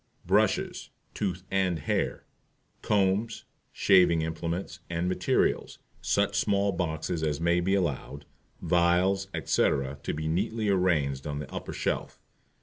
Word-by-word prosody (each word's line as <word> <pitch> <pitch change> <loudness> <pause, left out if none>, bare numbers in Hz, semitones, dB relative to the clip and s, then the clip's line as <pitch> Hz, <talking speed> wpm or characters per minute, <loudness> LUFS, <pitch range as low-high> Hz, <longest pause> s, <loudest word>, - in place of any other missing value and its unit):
BRUSHES - - +1 0.2
(tooth 90 -3 -3
and 95 -3 +1
hair), 75 - -2 0.6
COMBS, 105 +2 +1 0.3
SHAVING 90 -4 +4
IMPLEMENTS 85 +4 -4
and 85 +1 -1
MATERIALS, 90 - 0 0.2
such - - +1
small 100 0 +2
boxes 80 -2 -2
as 75 -2 -1
may 85 +1 +2
be 95 +3 +1
allowed, 75 -5 -2 0.4
vials, 90 +3 +2
etc., 70 -5 0
to - - -3
be 80 +1 -3
neatly 105 +6 -1
arranged 75 -8 +1
on 75 -1 -3
the 75 - -7
upper - - -5
shelf. - - -3
90 Hz, 125 wpm, -28 LUFS, 80-95 Hz, 0.6 s, SHAVING